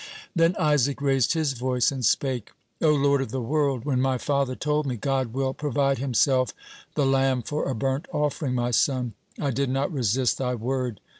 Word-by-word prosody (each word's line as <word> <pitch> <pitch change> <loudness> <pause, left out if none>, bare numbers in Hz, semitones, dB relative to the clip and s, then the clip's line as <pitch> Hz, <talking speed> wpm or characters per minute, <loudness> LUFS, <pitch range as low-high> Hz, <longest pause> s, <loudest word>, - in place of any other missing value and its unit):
Then 165 +1 +3
Isaac 145 -3 +2
raised 135 -3 +2
his 155 -4 0
voice 125 0 +1
and 135 -2 -5
spake: 125 0 0 0.3
"O 160 - +4
Lord 140 -2 +3
of 135 - -3
the 130 - -3
world, 135 0 0
when 130 -3 +1
my 130 -1 +1
father 140 -1 0
told 150 +1 -1
me, 125 - -1
'God 130 -1 -1
will 130 +1 -1
provide 140 -2 0
Himself 130 0 +2 0.4
the 145 - +2
lamb 135 -2 +2
for 150 +6 -2
a 130 - -1
burnt 135 +7 -1
offering, 150 -4 -1
my 120 0 0
son,' 125 -1 +1 0.3
I 140 -2 0
did 135 +1 -1
not 135 +6 -1
resist 125 -1 +1
Thy 125 -1 -1
word. 125 -2 -3
135 Hz, 190 wpm, -25 LUFS, 125-145 Hz, 0.4 s, O